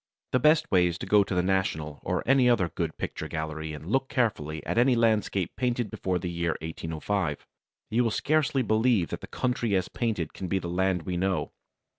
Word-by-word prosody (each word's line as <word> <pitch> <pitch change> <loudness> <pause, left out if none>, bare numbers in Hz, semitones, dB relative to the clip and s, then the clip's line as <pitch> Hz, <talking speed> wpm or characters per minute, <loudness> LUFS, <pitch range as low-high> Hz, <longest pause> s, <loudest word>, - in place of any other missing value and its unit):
The 130 - +3
best 155 +4 +4
way 90 -2 +5
is 85 -1 -3
to - - -6
go 105 -1 +5
to 95 - -4
the 90 - +2
National, 80 -6 -1
or - - -1
any 130 -1 +5
other 95 -8 +3
good - - -3
picture - - -4
gallery, 80 0 -4
and 75 0 -8
look 135 +1 +1
carefully 80 - -1
at - - 0
any 125 +1 +4
landscapes 110 -5 +1
painted 120 -3 -1
before 95 -1 -1
the 90 0 -4
year 85 -1 -1
1805. 80 +1 -3 0.5
You 120 +2 +2
will - - +2
scarcely 145 +2 +1
believe 110 -4 +2
that - - -5
the - - -8
country 120 -4 -1
as 95 -1 0
painted 105 -10 -2
can 95 - -5
be 95 - 0
the 85 - -4
land 90 0 0
we 90 +1 -3
know. 95 +1 0
95 Hz, 205 wpm, -27 LUFS, 85-120 Hz, 0.5 s, way